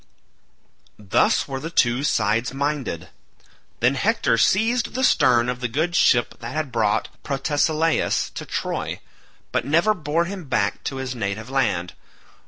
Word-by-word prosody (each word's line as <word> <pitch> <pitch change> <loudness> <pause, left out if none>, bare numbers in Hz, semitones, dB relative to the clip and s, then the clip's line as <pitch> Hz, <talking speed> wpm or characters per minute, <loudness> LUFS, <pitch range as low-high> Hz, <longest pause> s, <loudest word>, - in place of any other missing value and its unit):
Thus 105 -3 +1
were 135 -1 -4
the 160 - -5
two 125 -5 +2
sides 125 -2 0
minded. 135 - -3 0.7
Then 125 +3 +4
Hector 225 - +1
seized 225 +5 +2
the 260 - -1
stern 125 - +4
of 125 0 -2
the 125 - -1
good 160 +9 -1
ship 120 -7 +3
that - - -7
had 155 -4 -2
brought 110 -3 0
Protesilaus 155 +3 0
to - - -7
Troy, - - -3 0.5
but - - 0
never 170 +9 +3
bore 165 -1 -1
him 185 -1 -6
back 130 - -1
to 135 - -3
his 130 -1 -4
native 110 +1 -4
land. 90 -10 0
135 Hz, 145 wpm, -22 LUFS, 120-165 Hz, 0.7 s, Then